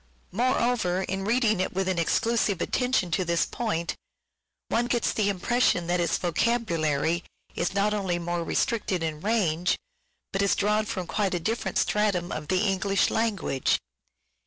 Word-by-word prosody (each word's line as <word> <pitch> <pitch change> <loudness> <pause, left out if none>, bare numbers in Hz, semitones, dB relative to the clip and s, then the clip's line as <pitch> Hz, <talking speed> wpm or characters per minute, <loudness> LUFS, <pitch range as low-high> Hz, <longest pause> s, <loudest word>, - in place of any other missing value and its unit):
Moreover, 235 -4 +1
in 195 +1 -3
reading 225 -2 +2
it 185 - -1
with 190 0 -1
an 185 -2 0
exclusive 215 +2 +1
attention 250 -5 0
to 185 - +1
this 170 -1 +1
point, 170 -8 -2 0.8
one 240 +1 +1
gets 240 -2 +1
the 205 -2 +1
impression 200 -1 +1
that 175 +1 0
its 170 - +1
vocabulary 170 -5 0 0.3
is 175 +3 -2
not 205 +1 +2
only 190 -4 -1
more 175 0 -2
restricted 195 -2 0
in 155 -1 -3
range, 180 -6 +1 0.6
but 195 - +1
is 200 - +3
drawn 210 +1 +1
from 185 -5 -3
quite 195 0 0
a - - 0
different 225 +7 -2
stratum 200 -5 +1
of 150 -1 -5
the 185 0 +1
English 195 0 +1
language. 205 - +1
190 Hz, 155 wpm, -26 LUFS, 175-220 Hz, 0.8 s, is